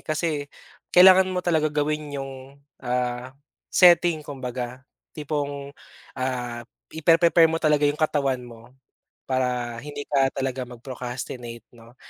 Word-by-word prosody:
kasi, 155 Hz, +2 st, -2 dB, 0.6 s
kailangan 185 Hz, +1 st, +7 dB
mo 180 Hz, -1 st, -3 dB
talaga 160 Hz, -3 st, +2 dB
gawin 150 Hz, 0 st, -2 dB
yung, 135 Hz, 0 st, -5 dB, 0.5 s
ah, 125 Hz, +1 st, -3 dB, 0.3 s
setting 170 Hz, -3 st, +5 dB
kumbaga. 125 Hz, -2 st, -6 dB, 0.3 s
Tipong, 145 Hz, -2 st, -4 dB, 0.4 s
ah, 125 Hz, -2 st, -3 dB, 0.2 s
i-pre-prepare 165 Hz, +1 st, +4 dB
mo 165 Hz, -, -1 dB
talaga 150 Hz, -2 st, +2 dB
yung 145 Hz, +1 st, 0 dB
katawan 140 Hz, -4 st, +1 dB
mo, 120 Hz, -2 st, -12 dB, 0.7 s
para 125 Hz, -2 st, -1 dB
hindi 145 Hz, +3 st, -7 dB
ka 135 Hz, -2 st, +1 dB
talaga 130 Hz, -2 st, -3 dB
mag-procrastinate, 120 Hz, -1 st, -7 dB
'no? 120 Hz, 0 st, -18 dB
140 Hz, 115 wpm, -24 LUFS, 125-155 Hz, 0.7 s, kailangan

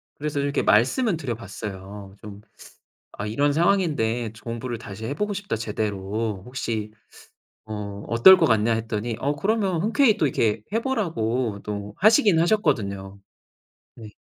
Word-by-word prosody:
그래서 150 Hz, -1 st, -3 dB
이렇게 140 Hz, 0 st, 0 dB
말씀은 165 Hz, -, +3 dB
드려 135 Hz, -7 st, -3 dB
봤어요. 100 Hz, -1 st, -8 dB
좀 105 Hz, -1 st, -10 dB, 0.8 s
"아 100 Hz, -, -4 dB
이런 140 Hz, +7 st, +1 dB
상황인데 150 Hz, -, +1 dB
좀 110 Hz, -1 st, -16 dB
공부를 120 Hz, +1 st, -4 dB
다시 110 Hz, -1 st, -8 dB
해 135 Hz, -, -2 dB
보고 210 Hz, +6 st, -2 dB
싶다 200 Hz, -8 st, -3 dB
제대로. 105 Hz, -1 st, -3 dB
혹시 115 Hz, -4 st, -4 dB, 0.7 s
어 105 Hz, -2 st, -6 dB
어떨 120 Hz, +12 st, +8 dB
것 -, -, +3 dB
같냐." 110 Hz, 0 st, +2 dB
했더니 110 Hz, 0 st, -3 dB
어 145 Hz, +2 st, 0 dB
그러면 195 Hz, -1 st, 0 dB
흔쾌히 225 Hz, +1 st, +3 dB
또 150 Hz, -, +1 dB
이렇게 110 Hz, -4 st, 0 dB
해 225 Hz, -, +1 dB
보라고 130 Hz, -, -1 dB
또 105 Hz, -1 st, -5 dB
하시긴 205 Hz, -4 st, +5 dB
하셨거든요. 100 Hz, -, 0 dB, 0.8 s
네. 110 Hz, -2 st, -12 dB
115 Hz, 300 characters per minute, -24 LUFS, 105-165 Hz, 0.8 s, 어떨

